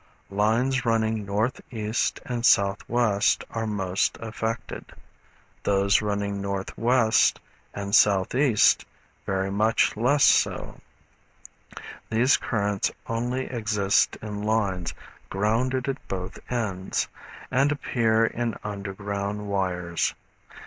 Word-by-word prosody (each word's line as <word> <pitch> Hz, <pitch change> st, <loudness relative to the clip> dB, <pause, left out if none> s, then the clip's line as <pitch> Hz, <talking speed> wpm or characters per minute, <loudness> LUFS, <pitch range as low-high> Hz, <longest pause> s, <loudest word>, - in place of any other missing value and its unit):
Lines 115 Hz, +6 st, +1 dB
running 110 Hz, -3 st, 0 dB
N. 110 Hz, +5 st, +1 dB, 0.2 s
E. 110 Hz, -3 st, -4 dB, 0.4 s
and 125 Hz, -1 st, -3 dB
S. 120 Hz, -, +7 dB
W. 100 Hz, +2 st, -1 dB, 0.3 s
are 115 Hz, -1 st, -2 dB
most 95 Hz, -3 st, -1 dB
affected; 110 Hz, 0 st, -4 dB, 0.8 s
those 100 Hz, +1 st, +3 dB
running 100 Hz, -1 st, -2 dB
N.W. 110 Hz, +4 st, 0 dB, 0.6 s
and 100 Hz, -1 st, -4 dB
S. 105 Hz, +1 st, +7 dB, 0.3 s
E. 130 Hz, -5 st, +5 dB, 0.5 s
very 95 Hz, 0 st, -1 dB
much 110 Hz, +3 st, +2 dB
less 125 Hz, +6 st, +2 dB
so. -, -, +2 dB, 1.3 s
These 120 Hz, +5 st, +4 dB
currents 105 Hz, -3 st, -1 dB
only 120 Hz, +3 st, -2 dB
exist 105 Hz, -4 st, +1 dB
in 105 Hz, -1 st, -5 dB
lines 100 Hz, -5 st, -1 dB, 0.3 s
grounded 120 Hz, +6 st, 0 dB
at 135 Hz, 0 st, -4 dB
both 95 Hz, -1 st, -5 dB
ends, 100 Hz, -6 st, -1 dB, 0.4 s
and 135 Hz, +3 st, +3 dB
appear 115 Hz, -6 st, +1 dB
in 115 Hz, -1 st, -2 dB
underground 100 Hz, 0 st, -4 dB
wires. 90 Hz, -3 st, -1 dB
105 Hz, 100 wpm, -25 LUFS, 100-115 Hz, 1.3 s, S